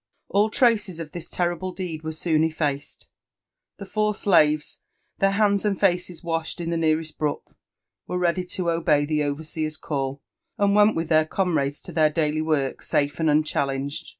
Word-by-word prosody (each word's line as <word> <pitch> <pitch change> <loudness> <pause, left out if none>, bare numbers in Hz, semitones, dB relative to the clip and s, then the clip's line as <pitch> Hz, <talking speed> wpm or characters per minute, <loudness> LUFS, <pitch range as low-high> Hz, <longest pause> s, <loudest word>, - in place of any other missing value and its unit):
All 205 +2 +3
traces 215 - +2
of 155 -2 -6
this 175 -2 -7
terrible 175 +1 -1
deed 180 -4 -5
were 160 - -3
soon 160 0 +1
effaced: 150 -3 -2 0.7
the 200 - -8
four 210 +1 0
slaves, 155 -7 +2 0.4
their 195 - +4
hands 200 0 +2
and 205 -2 0
faces 180 -2 0
washed 165 0 -3
in 170 -1 -3
the - - 0
nearest 160 -1 0
brook, 150 -1 -3 0.5
were 180 - -2
ready 180 0 +1
to 180 -1 -2
obey 155 -3 +2
the 150 0 0
overseer's 155 +1 -3
call, 140 -2 -3 0.3
and 200 0 +3
went 210 +1 +5
with 165 -1 -2
their 155 -1 +4
comrades 155 -5 0
to - - -10
their 155 -2 +3
daily 155 0 0
work 150 -4 -1
safe 145 +1 0
and 160 -1 +2
unchallenged. 140 -2 -1
160 Hz, 170 wpm, -24 LUFS, 150-185 Hz, 0.7 s, went